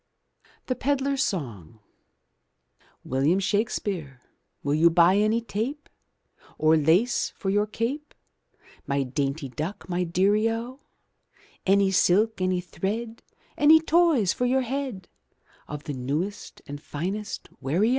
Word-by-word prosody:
THE 255 - 0
PEDLAR'S 275 +1 0
SONG 115 - -3 1.3
William 140 +7 +1
Shakespeare 195 - -2 0.4
Will 140 - 0
you 160 +3 +5
buy 175 +3 +5
any 215 +3 +2
tape. 235 +7 -4 0.7
Or 155 +1 +4
lace 165 +11 +2
for 190 - -2
your 205 +1 +2
cape, 255 +8 -4 0.7
My 140 0 +1
dainty 135 +2 -2
duck, 155 +9 -5
my 180 0 -1
dear 185 +4 +2
0? 225 +4 -1 0.9
Any 195 0 +4
silk, 200 +3 +3
any 185 -1 +1
thread, 220 +6 -4 0.3
Any 310 +2 +7
toys 320 - +3
for 250 - -1
your 265 +1 +2
head, 255 -6 -4 0.6
Of 150 0 -7
the 145 - -5
newest 150 +11 -4
and 145 0 -8
finest 195 +8 -5
wear 145 +7 -1
0? 220 - +4
195 Hz, 125 wpm, -26 LUFS, 155-230 Hz, 1.3 s, Any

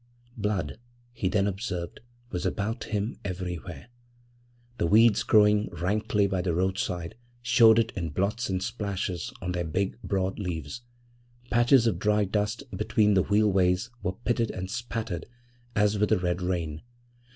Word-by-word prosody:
Blood, 100 -9 -2 0.3
he 100 -5 -1
then 100 0 +2
observed, 95 -4 -4 0.3
was 90 - -3
about 105 +3 -2
him 105 +1 -3
everywhere. 90 - -5 0.9
The 85 - +2
weeds 110 +3 +5
growing 105 0 +4
rankly 105 +2 0
by 95 -2 0
the 90 -2 -1
roadside 90 -2 -1 0.3
showed 115 -2 +6
it 115 -1 +2
in 85 -4 -2
blots 100 +9 -1
and 95 -1 -1
splashes 95 -5 -3
on 90 - -2
their 90 -1 -1
big, 95 +7 -2
broad 95 0 -1
leaves. 90 - -4 0.7
Patches 120 +1 +5
of 105 -7 +1
dry 105 +1 +2
dust 105 +5 -1
between 105 -3 +2
the 95 - +4
wheel 105 +2 +3
ways 95 +4 +2
were 90 - -2
pitted 115 -1 +1
and 95 0 -5
spattered 115 -7 -4 0.5
as 105 -1 +2
with 105 +1 +1
a 110 - +5
red 90 0 -1
rain. 85 -4 -2
100 Hz, 150 wpm, -27 LUFS, 90-110 Hz, 0.9 s, showed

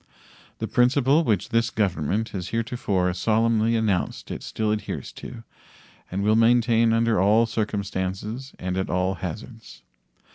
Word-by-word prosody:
The - - -3
principle 135 +5 +3
which 105 - 0
this 115 +1 +1
Government 105 - -1
has 90 -3 -5
heretofore 110 -5 -1
solemnly 115 +3 +2
announced 105 -5 -1
it - - -5
still 110 -1 -2
adheres 105 -1 -4
to, 120 -2 -10 0.7
and 95 +2 -2
will 105 +1 +3
maintain 115 0 +4
under 115 -3 +2
all 105 +4 +4
circumstances 105 +2 -3
and 90 0 -3
at 95 - -2
all 90 +1 0
hazards. 110 +5 -8
110 Hz, 135 wpm, -24 LUFS, 95-115 Hz, 0.7 s, maintain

